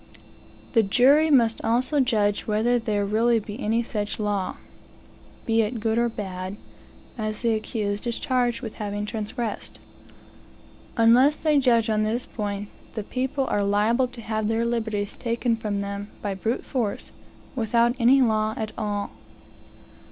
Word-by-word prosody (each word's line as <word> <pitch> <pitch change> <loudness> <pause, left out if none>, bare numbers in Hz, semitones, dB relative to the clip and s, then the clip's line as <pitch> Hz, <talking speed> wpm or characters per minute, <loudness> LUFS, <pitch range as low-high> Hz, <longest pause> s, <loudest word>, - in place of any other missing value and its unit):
The 230 - +6
jury 270 +9 +4
must 235 -6 +3
also 255 +6 +1
judge 210 -6 +1
whether 225 +3 +2
there 210 -3 -1
really 230 +3 +2
be 210 +2 -8
any 225 +3 +1
such 210 -3 -3
law, 205 -3 -1 0.9
(be 225 0 +3
it 225 +2 -2
good 225 +1 +1
or 235 0 +2
bad,) 190 -2 -5 0.6
as 215 -1 -3
the 230 -1 +3
accused 215 -1 -2
is 235 - -2
charged 250 -1 0
with 220 - -5
having 205 0 -3
transgressed. 220 +1 -4 1.2
Unless 250 +6 +5
they 305 -2 +3
judge 235 -4 +3
on 215 -1 +1
this 225 +3 -1
point, 205 -2 -4 0.3
the 215 - -3
people 265 +4 -2
are 205 -5 0
liable 215 +5 +2
to 245 -1 -11
have 220 -1 -2
their 225 +1 +1
liberties 220 -4 -2
taken 235 0 0
from 210 -2 -3
them 200 +1 -5
by 200 -1 -1
brute 220 +5 -2
force, 230 -6 -3 0.4
without 235 0 +2
any 260 +3 +5
law 220 -1 +1
at 215 -1 -3
all. 205 -2 -2
225 Hz, 150 wpm, -25 LUFS, 210-240 Hz, 1.2 s, The